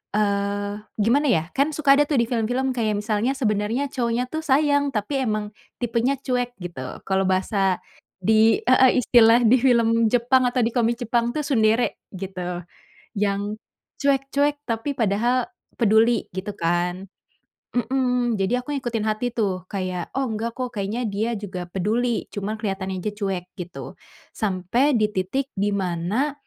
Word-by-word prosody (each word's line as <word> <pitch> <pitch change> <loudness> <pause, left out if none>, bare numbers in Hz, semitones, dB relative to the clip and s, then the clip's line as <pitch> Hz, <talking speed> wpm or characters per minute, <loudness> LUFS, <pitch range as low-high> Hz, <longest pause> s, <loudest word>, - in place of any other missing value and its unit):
Eee, 205 0 0 0.2
gimana 245 +8 +3
ya, 160 -6 +2
kan 280 +3 +2
suka 280 -2 +5
ada 295 - +4
tuh 285 - +2
di 235 - +3
film-film, 250 +3 0
kayak 220 -3 0
misalnya 215 +4 0
sebenernya 225 +3 0
cowoknya 240 -1 0
tuh 315 0 -3
sayang, 285 0 +2
tapi 265 +6 -1
emang 215 -2 -1 0.3
tipenya 240 +3 +1
cuek 245 -1 -1
gitu, 175 -7 -6 0.3
kalo 190 0 +2
bahasa 190 0 +1 0.4
di 220 +2 +4
heeh, 255 0 +5
istilah 230 -1 +6
di 255 +4 +6
film 230 -2 +3
Jepang 250 +2 +3
atau 250 0 0
di - - +1
komik 235 0 +1
Jepang 235 0 +1
tuh 305 - 0
tsundere 225 -2 +2
gitu. 180 -2 -5 0.6
Yang 205 +1 -1 0.4
cuek, 275 -1 +2
cuek 290 +1 +2
tapi 230 +5 -1
padahal 235 +3 +1 0.3
peduli, 225 +1 +4
gitu 200 +2 -4
kan 175 +3 -1 0.7
mmm, 250 -2 +1
jadi 245 +6 0
aku 295 - -5
ngikutin 240 -5 -2
hati 215 +3 -1
tuh, 190 -5 0
kayak 185 -3 -3
oh 270 - +1
enggak 225 +1 -3
kok, 250 -1 -3
kayaknya 210 +5 -2
dia 215 +3 -1
juga 185 -3 -6
peduli, 225 +6 0
cuma 205 +2 -3
keliatannya 195 -2 -3
aja 210 - -2
cuek, 195 -4 -3 0.2
gitu. 175 0 -7 0.4
Sampai 220 +7 +1
di 215 - +3
titik 195 +9 -1
dimana, 200 - -1
225 Hz, 150 wpm, -23 LUFS, 200-250 Hz, 0.7 s, istilah